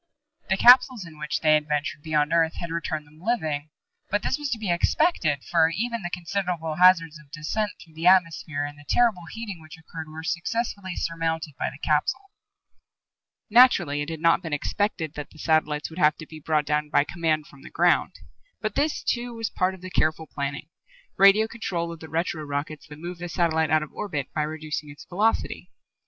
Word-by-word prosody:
The 190 - +2
capsules 250 -2 +6
in 155 -2 -13
which 150 0 -2
they 155 -1 +5
had 150 0 +2
ventured 150 0 -2
beyond 150 0 0
Earth 165 -1 +3
had 170 -1 -5
returned 160 -2 -3
them 155 +2 -20
living. 155 -9 -1 0.4
But 205 +1 0
this - - -1
was 295 -1 -3
to 235 - -1
be 210 -5 -2
expected, 170 - +1
for 165 -2 +3
even 235 +6 -2
the 175 - -4
considerable 175 -3 -3
hazards 165 -4 +5
of 150 -2 -19
descent 165 +8 -2
through 165 - -16
the 165 +2 -1
atmosphere 165 -5 +3
and 145 0 -8
the 145 - -15
terrible 220 -8 +2
heating 210 -7 -7
which 155 0 -12
occurred 160 0 -9
were 160 +1 -8
successfully 190 +2 -2
surmounted 165 -2 -2
by - - 0
the 135 - -12
capsule. 155 - 0 1.2
Naturally, 230 - +5
it 145 - -4
had 160 -1 -6
not 165 +2 +4
been 165 -4 -5
expected 160 0 -1
that 150 -1 -7
the - - -18
satellites 155 -1 0
would 165 - -8
have 150 -2 +4
to 160 - -9
be 155 0 -11
brought 155 0 0
down 150 0 0
by 145 - +4
command 160 -1 -1
from 140 -2 -17
the - - -11
ground. - - +2 0.5
But - - -3
this, 300 +1 0
too, 240 -1 -2
was 225 -1 -3
part 185 0 0
of 185 - -16
the 185 0 -8
careful 160 -1 +1
planning 140 0 -5 0.5
radio 200 +3 +6
control 175 -7 -3
of 165 - -9
the 160 - -10
retro 160 -1 -2
rockets 145 +1 -5
that 150 - -11
move 175 +2 -7
the 175 0 -5
satellite 160 -3 +1
out 155 -1 +3
of 155 - -11
orbit 150 -10 -4
by 155 - 0
reducing 155 -1 -4
its 145 - -12
velocity. 210 +5 -1
165 Hz, 200 wpm, -25 LUFS, 150-185 Hz, 1.2 s, capsules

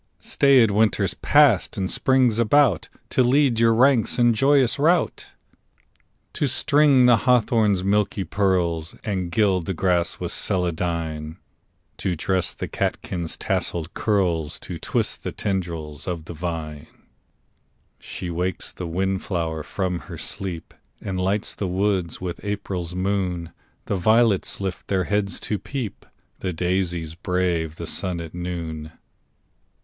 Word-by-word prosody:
Staid 130 -6 +4
Winter's 105 -1 +2
passed 145 -10 +3
and 95 -1 -1
Spring's 130 -4 +2
about 120 - +3 0.2
To - - +3
lead 130 -1 +3
your 115 0 +5
ranks 125 -1 +3
in 120 -1 +4
joyous 135 +1 +3
rout; 165 +3 +2 1.1
To 145 - 0
string 140 0 +4
the 120 -2 +6
hawthorn's 110 -3 +2
milky 100 0 +1
pearls, 90 -5 0
And 95 -5 -2
gild 95 -3 +2
the 95 - -2
grass 90 -1 +1
with - - -3
celandine; 85 -3 -2 0.6
To 90 -2 -1
dress 95 +3 -1
the - - -4
catkins' 85 -3 -3
tasselled 85 0 -2
curls, 95 - 0
To - - -7
twist - - -2
the - - -3
tendrils 85 -6 -4
of 85 -3 -4
the 85 - -7
vine. 80 -2 -5 1.1
She 90 - -6
wakes 90 +1 -3
the 90 - -6
wind 95 +3 -1
flower 80 -4 -2
from 90 +2 -2
her - - -6
sleep, 90 -4 -5 0.3
And 95 -2 -3
lights 100 +3 0
the 100 - -3
woods 95 -2 0
with 90 -2 -5
April's 95 -4 -4
moon; 90 -3 -1 0.3
The 100 - -1
violets 110 +1 +2
lift 95 -2 -4
their 95 -2 +1
heads 100 -1 -1
to 105 - -2
peep, 130 -7 -6 0.3
The 90 - -3
daisies 90 -2 -1
brave 85 -3 -1
the 85 - -6
sun 90 +1 -2
at 80 -1 -7
noon. 85 -3 -5
95 Hz, 135 wpm, -23 LUFS, 85-110 Hz, 1.1 s, the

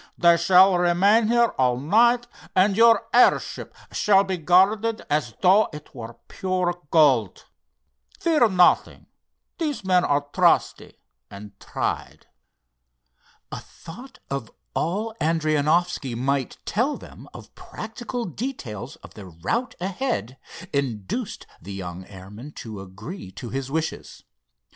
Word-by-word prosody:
They 170 -1 +5
shall 185 +2 +5
remain 195 +6 +3
here 235 0 +3
all 125 -1 +2
night, 235 - +3 0.3
and 195 +2 +3
your 230 0 +5
airship 245 - +2 0.2
shall 195 -2 +3
be 190 -1 -2
guarded 200 +7 +2
as 145 -6 -1
though 195 +4 +5
it 150 -1 -11
were 115 -3 -9
pure 180 -2 -2
gold. 135 - +3 0.7
Fear 305 -9 +3
nothing, 180 -2 +2 0.5
these 300 -8 -2
men 180 -1 +3
are 145 0 +1
trusty - - +1 0.3
and 100 +1 -10
tried." - - -4 1.3
A - - -5
thought 245 +12 -13
of 135 -5 -4 0.2
all 210 +7 -2
Adrianoffski 155 -3 0
might 135 +2 -2
tell 250 +8 0
them - - -14
of - - -13
practical 240 +2 -7
details 150 - -6
of - - -13
their 100 -3 -11
route 95 - -3
ahead, 185 - -3 0.3
induced 140 - -3 0.2
the 100 - -8
young 90 -1 -7
airman 105 +9 -11
to 110 -4 -8
agree 100 - -9
to 120 - -8
his 135 0 -4
wishes. 160 +2 -4
170 Hz, 120 wpm, -23 LUFS, 130-215 Hz, 1.3 s, They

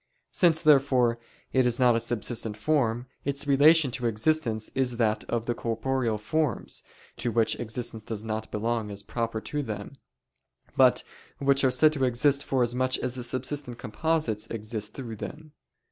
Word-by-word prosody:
Since, 170 -2 +3
therefore, 130 -6 +4 0.3
it 130 -1 +4
is 120 0 0
not 125 -2 +5
a - - +2
subsistent 115 -1 -2
form, 120 -2 +1 0.2
its 140 +1 -1
relation 145 +1 +5
to 125 -1 -2
existence 115 -1 0
is 125 -3 0
that 110 -2 +1
of 115 -1 -2
the 120 - 0
corporeal 115 0 -1
forms, 140 +3 -1 0.4
to 120 - -1
which 115 -1 +1
existence 115 -1 -4
does 110 -1 -5
not 110 0 -4
belong 110 0 -2
as 100 0 -7
proper 115 -2 -3
to 150 +5 -3
them, 105 -3 -6 0.8
but - - +5 0.3
which 140 0 +2
are 130 - +5
said 150 +5 +4
to 140 -3 -1
exist 135 +3 +2
forasmuch 130 -1 +1
as 125 -1 -3
the 125 -1 -5
subsistent 130 +1 -4
composites 115 -3 -1
exist 110 -1 -5
through 115 -5 -6
them. 155 +7 -8
120 Hz, 160 wpm, -27 LUFS, 110-140 Hz, 0.8 s, not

